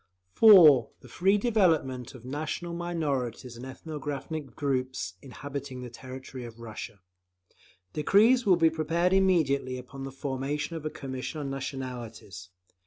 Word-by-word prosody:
(4) 170 - +8
The - - -14
free 195 +3 +2
development 160 - +1
of 125 -1 -12
national 155 +5 -4
minorities 140 -9 -3
and 120 - -10
ethnographic 150 +1 -6
groups 130 -8 -2
inhabiting 135 -1 -7
the 125 - -8
territory 130 +1 -9
of 115 -1 -10
Russia. 110 -2 -8 0.9
Decrees 220 - +4
will 190 -4 +5
be 165 -1 +4
prepared 165 +3 +1
immediately 155 -9 +2
upon 135 +2 -9
the 135 - -5
formation 140 +4 -3
of 155 -1 -4
a - - -2
Commission 135 +2 -6
on 135 -1 -4
Nationalities. 125 -9 -6
140 Hz, 130 wpm, -28 LUFS, 130-165 Hz, 0.9 s, 4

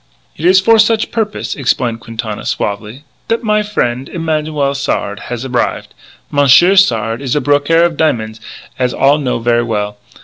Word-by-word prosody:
"It 155 - -6
is 185 +1 +6
for 225 +3 +4
such 220 0 +2
purpose," 215 -2 -2
explained 125 -4 -1
Quintana 115 -2 -6
suavely, 105 +6 -4 0.2
"that 230 +2 -1
my 210 -1 +2
frien', 130 -11 -2
Emanuel 155 -4 -2
Sard, 105 -7 -2
has 120 +1 -4
arrive. 125 -2 -2 0.4
Monsieur 145 +7 +5
Sard 115 - +2
is 135 -1 -2
a - - +2
brokaire 145 +4 +2
of 170 -3 -2
diamon's, 110 -8 -1 0.4
as 125 -1 0
all 140 +2 +3
know 130 -4 -1
ver' 120 0 +1
well. 105 -2 -3
140 Hz, 160 wpm, -14 LUFS, 115-165 Hz, 0.4 s, is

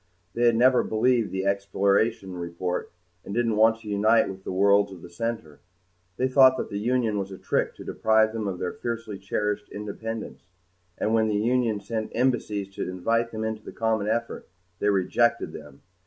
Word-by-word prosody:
They 120 0 +2
had 115 - +4
never 125 +2 +5
believed 115 0 +1
the 95 0 -2
exploration 100 +1 +1
report 90 +1 -4 0.3
and 100 - -6
didn't 115 -2 +1
want 110 +1 +4
to 110 - -12
unite 105 +3 +3
with 95 0 -8
the - - -5
worlds 100 +1 +3
of 90 -3 -11
the 85 - -11
center. 85 -7 -4 0.6
They 130 - +1
thought 130 0 +6
that - - -4
the 100 - -2
Union 115 -2 0
was 95 0 -4
a 95 - -7
trick - - -1
to - - -10
deprive 110 0 +2
them 110 -2 -3
of 95 -2 -3
their 90 0 -3
fiercely 115 -4 -5
cherished 105 +1 -2
independence, 110 +2 -6 0.6
and 110 - 0
when 110 -1 +3
the 105 - 0
Union 115 0 +1
sent 110 0 -4
embassies 110 -5 0
to - - -4
invite 115 +6 0
them 110 -1 -5
into 110 0 -3
the - - -9
common 110 -2 0
effort, 115 +2 -2 0.3
they 105 - +2
rejected 110 +5 +1
them. 70 -1 -12
110 Hz, 185 wpm, -26 LUFS, 100-115 Hz, 0.6 s, thought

